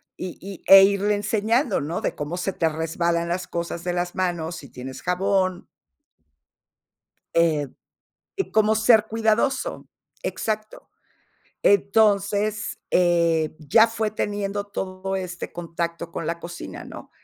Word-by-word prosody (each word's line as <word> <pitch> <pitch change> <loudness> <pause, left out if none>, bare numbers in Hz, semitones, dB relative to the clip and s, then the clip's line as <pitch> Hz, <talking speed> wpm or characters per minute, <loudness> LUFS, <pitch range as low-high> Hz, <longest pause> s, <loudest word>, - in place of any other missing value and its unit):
Y 180 -2 -6
y, 195 -1 -9
e 195 - +11
irle 200 +1 +1
enseñando, 215 - +1
¿no? 160 +4 -3
De - - -2
cómo 150 +4 -4
se 185 +1 -2
te 165 - +1
resbalan 170 +2 -1
las 180 +1 -2
cosas 170 0 -4
de 175 - -1
las 175 0 -2
manos, 175 -3 -1
si 140 -4 -10
tienes 130 +2 -8
jabón. 185 0 0 1.7
Eh, 155 -4 +2 0.8
como 215 0 +4
ser 220 0 +5
cuidadoso. 225 +5 0 0.3
Exacto. 215 -1 -4 0.7
Entonces, 205 +1 +2
eh, 170 -3 +2
ya 220 +9 +5
fue 225 -2 -2
teniendo 205 -1 -2
todo 190 -1 -4
este 180 -2 -5
contacto 170 0 -4
con 165 - -5
la 170 +1 -3
cocina, 175 +1 -8
¿no? - - -11
185 Hz, 125 wpm, -24 LUFS, 170-210 Hz, 1.7 s, e